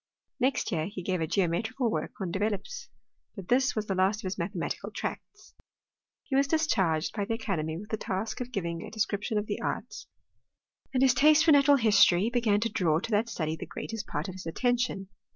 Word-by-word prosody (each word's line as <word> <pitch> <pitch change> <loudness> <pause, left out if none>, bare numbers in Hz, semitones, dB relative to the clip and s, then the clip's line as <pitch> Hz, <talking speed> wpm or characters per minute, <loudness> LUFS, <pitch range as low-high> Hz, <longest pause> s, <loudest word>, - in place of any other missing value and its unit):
Next 255 -2 +1
year 160 -3 -1
he 195 -2 -7
gave 185 -1 -1
a 160 - 0
geometrical 220 - 0
work - - -3
on 185 -4 -3
Developes; 215 - -3 0.5
but 195 -4 -9
this 260 +1 +3
was 215 -1 -1
the 195 - -1
last 190 +3 +1
of - - -21
his 185 +1 -3
mathematical 170 0 -3
tracts. - - -7 0.7
He 270 - -3
was 275 +1 +3 0.2
charged 170 - 0
by 205 -2 -1
the 225 +2 -1
academy 160 -8 -3
with 210 +4 -9
the 220 - -1
task 200 +5 -3
of 250 0 -5
giving 170 -7 -3
a - - -7
description 215 0 -1
of 210 - 0
the - - -4
arts, - - -4 0.8
and 260 -1 +2
his 265 - +5
taste 305 +2 +5
for 325 - +6
natural 285 -1 +6
history 205 -3 +4
began 230 -4 +2
to 230 - +1
draw 160 -7 +1
to 225 - -6
that 215 +3 +1
study 160 -7 -2
the - - -8
greatest 225 -2 -6
part - - -3
of 185 - -6
his 185 -2 -8
attention. 245 0 0
210 Hz, 205 wpm, -29 LUFS, 185-245 Hz, 0.8 s, for